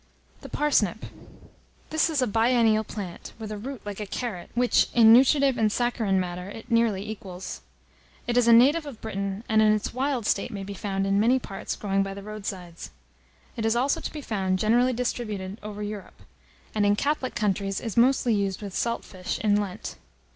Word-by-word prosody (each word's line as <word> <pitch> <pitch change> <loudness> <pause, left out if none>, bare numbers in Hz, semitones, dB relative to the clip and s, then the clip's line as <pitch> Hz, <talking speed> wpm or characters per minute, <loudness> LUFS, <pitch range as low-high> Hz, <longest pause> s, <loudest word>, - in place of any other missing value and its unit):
THE - - -10
PARSNIP. 225 - +1 0.9
This 315 +1 +2
is 295 -5 +1
a - - +3
biennial 225 -1 +3
plant, 200 -5 -7
with 220 -1 -7
a 210 - -4
root 265 +3 -7
like 205 -1 -6
a 210 - -4
carrot, 200 -6 -5
which, 245 0 +3
in 225 -2 +8
nutritive 270 +1 +5
and 215 -1 +3
saccharine 225 -5 +1
matter, 180 +1 -4
it 225 +4 -10
nearly 220 -4 +2
equals. 190 -4 -7 0.6
It 240 - -1
is 245 -1 +4
a - - +7
native 285 +7 +5
of 255 -6 -9
Britain, 200 -1 -4
and, 220 -1 +3
in 215 0 +5
its 215 -1 -2
wild 260 -2 -1
state, 200 - 0
may 200 -2 -6
be 200 +1 -6
found, 195 -1 -2
in 195 +1 +2
many 240 +5 +4
parts, 195 -6 -5
growing 195 -1 0
by 195 0 -3
the 200 - -8
road 215 -1 -7
sides. 175 -4 -6 0.7
It 225 - -3
is 225 +1 +2
also 260 +4 +1
to - - -4
be 300 - -7
found, 190 -7 -1
generally 240 +5 +3
distributed 215 -5 -3
over 210 0 -6
Europe; 205 -1 -8 0.5
and, 215 - +1
in 205 0 +4
Catholic 280 +2 -1
countries, 195 -2 0
is 225 -5 -5
mostly 245 0 +4
used 200 -1 -1
with 200 -2 -6
salt 235 +3 -1
fish, 185 -1 -5
in 205 -1 +4
Lent. 195 -3 -6
215 Hz, 195 wpm, -26 LUFS, 195-240 Hz, 0.9 s, in